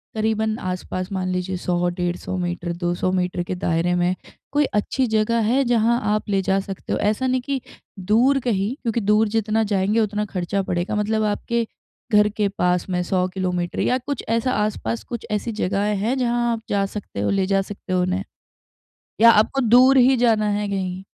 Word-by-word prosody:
करीबन 220 0 0
आस-पास 185 +1 -4
मान 185 -1 -2
लीजिए, 180 0 -2
100-150 175 +1 -2
मीटर, 175 -1 -3
200 175 +1 -1
मीटर 180 -1 -1
के 185 - -4
दायरे 175 0 0
में 175 +1 +1 0.4
कोई 290 0 +3
अच्छी 250 +4 0
जगह 220 +1 +1
है, 270 +2 +3
जहाँ 235 0 +2
आप 215 -1 -2
ले 195 -1 +2
जा 195 +1 +1
सकते 195 -1 -5
हो? - - -1
ऐसा 215 +5 +1
नहीं 255 0 +1
कि 270 0 -3 0.4
दूर 240 +9 +3
कहीं, 225 -1 -1
क्योंकि 230 -1 -1
दूर 210 +2 +3
जितना 220 0 0
जाएँगे, 200 +4 +2
उतना 210 -1 0
खर्चा 195 0 -2
बढ़ेगा। 180 +2 -2
मतलब 215 +1 0
आपके 235 +1 -2 0.5
घर 210 0 +5
के 210 - +2
पास 180 +1 +1
में 180 -1 0
100 185 0 0
किलोमीटर 180 -2 -3
या 250 - +2
कुछ 265 +1 -5
ऐसा 230 +3 +1
आस-पास 115 - -2
कुछ 235 - -6
ऐसी 210 +3 -1
जगहें 205 0 0
हैं, 230 +7 0
जहाँ 240 -1 +1
आप 225 -1 -2
जा 200 -1 +1
सकते 195 - -7
हो, 105 - 0
ले 195 -1 +1
जा 195 0 +2
सकते 195 -1 -7
हो 180 - +2
उन्हें? 185 +2 -1 1.0
या 230 - +9
आपको 225 +6 +2
दूर 255 +3 +6
ही 260 +1 +6
जाना 225 -3 +3
है 205 0 -1
कहीं? 190 -2 -3
205 Hz, 185 wpm, -22 LUFS, 185-230 Hz, 1.0 s, या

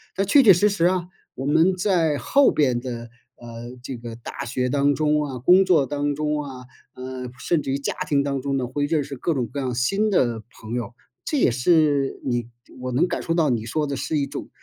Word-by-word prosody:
但 195 - 0
确 275 +8 +6
确 220 - +8
实 190 +3 +4
实 195 -5 +1
啊， 180 -1 +1 0.3
我 135 - -5
们 160 +6 +3
在 175 -6 +1
后 280 - +3
边 130 -5 +1
的， 120 -2 -6 0.3
呃， 120 +1 -10
这 130 -1 -6
个 115 -1 -8
大 115 - -7
学 125 +1 -1
当 140 +2 +2
中 150 +1 +1
啊， 135 -3 -5
工 180 +10 +5
作 170 -7 +3
当 145 +1 -2
中 150 0 -1
啊， 130 -3 -9 0.3
呃， 130 0 -6
甚 165 +1 0
至 135 - -6
于 135 - 0
家 140 - -3 0.2
庭 140 -1 +2
当 140 -1 -2
中 140 0 -1
呢， 130 - -1
会 145 +4 -2
认 150 -1 +1
识 140 0 -7
各 160 +5 -1
种 125 -3 0
各 140 +5 -6
样 130 -3 -2
新 195 - +1
的 120 - +1 0.2
朋 110 +1 -8
友， 120 -1 -4 0.3
这 300 - -2
也 190 - +3
是 145 +1 +2
你 120 -2 -1 0.3
我 130 0 -3
能 145 +9 +2
感 - - -3
受 165 - -1
到 155 -6 +2
你 115 -2 -1
说 150 +5 -1
的 140 -1 -3
是 155 - -2
一 140 - +1
种 140 - -7
140 Hz, 245 characters per minute, -23 LUFS, 125-160 Hz, 0.3 s, 确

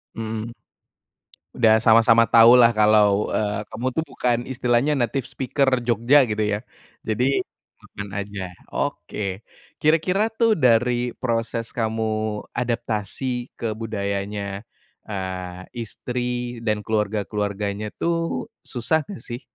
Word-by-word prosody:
Mmm. 110 0 -4 1.1
Udah 110 -2 +5
sama-sama 115 0 +5
tahulah 115 +1 +8
kalau, 105 -1 +4
eee, 105 0 -1
kamu 120 +3 -3
tuh 160 +5 -2
bukan 125 -4 0
istilahnya 130 +2 +1
native 130 0 -1
speaker 130 0 0
Jogja 120 +4 +4
gitu 105 0 0
ya 105 0 0 0.4
jadi, 125 +5 +1 0.4
kapan 100 -1 -9
aja 100 -1 -7 0.3
oke 100 0 -3 0.4
kira-kira 165 +6 +3
tuh 225 0 +2
dari 125 - +2
proses 115 -1 -1
kamu 110 -1 -1 0.5
adaptasi 120 +1 -2
ke 115 -2 -2
budayanya, 100 -1 -3 0.5
eee, 95 -2 -5 0.2
istri 120 +1 -4
dan 105 -2 -1
keluarga-keluarganya 105 -1 -2
tuh 165 0 -1 0.2
susah 145 +6 0
gak 200 - -7
sih? 120 +2 -6
115 Hz, 105 wpm, -23 LUFS, 105-125 Hz, 1.1 s, tahulah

